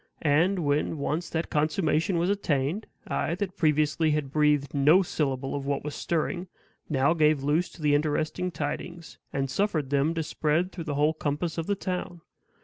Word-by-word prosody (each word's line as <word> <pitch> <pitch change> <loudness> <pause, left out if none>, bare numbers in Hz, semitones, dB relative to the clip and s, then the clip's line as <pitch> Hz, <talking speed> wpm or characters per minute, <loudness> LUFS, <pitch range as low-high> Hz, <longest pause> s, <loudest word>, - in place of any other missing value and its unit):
And, 165 +4 +2
when 145 +2 +1
once 155 +4 -2
that 160 0 -3
consummation 155 +3 +1
was 175 +3 +2
attained, 170 0 -1 0.2
I, 170 - -1
that 190 -1 -4
previously 155 0 +2
had 150 -3 -1
breathed 150 -1 +2
no 150 +7 +5
syllable 135 -6 -2
of 140 -1 -4
what 140 -1 -1
was 150 0 -4
stirring, 175 +2 -2 0.4
now 140 0 +3
gave 155 -3 +3
loose 150 +5 +1
to 160 - -11
the 145 -1 +3
interesting 155 +4 0
tidings, 160 +1 -5
and 135 0 -1
suffered 155 -2 -1
them 145 +4 +2
to 165 - -1
spread 155 +4 0
through 170 -3 -7
the 145 -3 -2
whole 150 +2 +3
compass 155 +2 -2
of 165 - -3
the 200 - +1
town. 180 -2 -4
155 Hz, 175 wpm, -27 LUFS, 145-170 Hz, 0.4 s, no